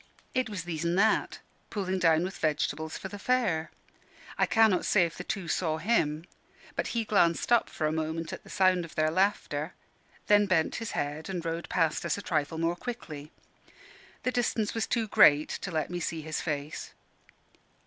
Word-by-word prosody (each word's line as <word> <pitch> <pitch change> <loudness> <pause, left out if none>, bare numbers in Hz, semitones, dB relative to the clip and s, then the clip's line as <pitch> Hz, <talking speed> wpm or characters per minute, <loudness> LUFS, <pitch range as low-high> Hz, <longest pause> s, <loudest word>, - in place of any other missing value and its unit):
It 255 -2 0
was 200 -5 -4
These 165 -2 -4
an' 170 +1 +1
That, 215 +3 +2 0.3
pulling 190 -2 -2
down 165 -1 +4
with 190 +2 -5
vegetables 155 0 -1
for - - -6
the 205 +1 -8
fair. 195 -10 +1 0.7
I - - +2
cannot 220 -5 +4
say 190 -4 +4
if 165 - -5
the 180 - -6
two 185 -2 -4
saw 160 -1 0
him: 160 -5 +1 0.5
but - - -1
he 230 - +1
glanced 175 -2 +2
up 240 -2 +4
for 155 - -3
a 155 - +1
moment 160 +1 -3
at - - -7
the - - -15
sound 185 -2 +3
of 165 - -10
their 155 0 +2
laughter, 170 -4 0 0.5
then 205 0 +5
bent 165 -4 +1
his 225 - -5
head 150 +4 -3
and 175 -3 -4
rowed 165 +1 -3
past 165 -3 +1
us - - 0
a 205 - -7
trifle 150 0 -1
more 165 +1 0
quickly. 160 -9 -7 0.9
The 250 - +1
distance 230 -3 0
was 225 - -1
too 230 -2 0
great 150 -6 +6
to - - -4
let 160 -1 -2
me 175 - -2
see 165 -1 -3
his 155 0 -3
face. 145 -2 -4
170 Hz, 190 wpm, -29 LUFS, 160-205 Hz, 0.9 s, great